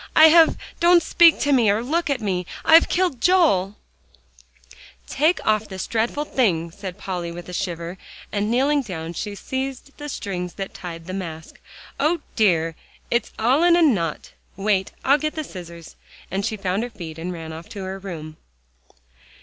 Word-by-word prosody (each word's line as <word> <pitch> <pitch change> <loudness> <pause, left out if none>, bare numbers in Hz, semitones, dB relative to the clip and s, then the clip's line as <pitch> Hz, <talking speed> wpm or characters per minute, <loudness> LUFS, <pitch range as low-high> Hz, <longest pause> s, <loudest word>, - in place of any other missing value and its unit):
"I 315 0 +9
have 325 0 +6 0.2
don't 345 0 +5
speak 335 0 +5
to 290 - +1
me, 240 -6 +4
or 210 +3 +1
look 325 +6 -1
at 270 -4 0
me. 180 -4 -2 0.2
I've 325 +1 +7
killed 355 -9 0
Joel!" 300 - +3 1.3
"Take 310 +6 +1
off 215 0 +2
this 190 -1 -5
dreadful 235 +6 -1
thing," 170 - 0
said 190 0 -8
Polly 180 -4 -4
with 175 0 -9
a 180 - -8
shiver, 175 -1 -4 0.3
and 205 0 -1
kneeling 275 +5 +2
down, 170 -8 -6
she 205 +4 -5
seized 265 +4 -5
the 295 0 -6
strings 180 -8 -4
that 195 -1 -6
tied 165 -2 -8
the 185 - -6
mask. 165 -4 -7 0.4
"O 310 +3 +1
dear! 165 -7 +2 0.4
it's 235 - 0
all 250 +7 +3
in 345 0 +5
a 345 - +4
knot. 180 - 0 0.3
Wait, 195 -1 0
I'll 280 +3 +5
get 305 +2 -2
the 310 - -3
scissors," 170 - -10 0.4
and 195 +2 -1
she 220 0 -2
found 195 +1 -1
her 240 - -3
feet, 165 -8 -9
and 175 +2 -4
ran 165 -2 -7
off 160 +1 -10
to 200 - -7
her 190 +1 -5
room. 160 -5 -8
205 Hz, 175 wpm, -22 LUFS, 175-280 Hz, 1.3 s, I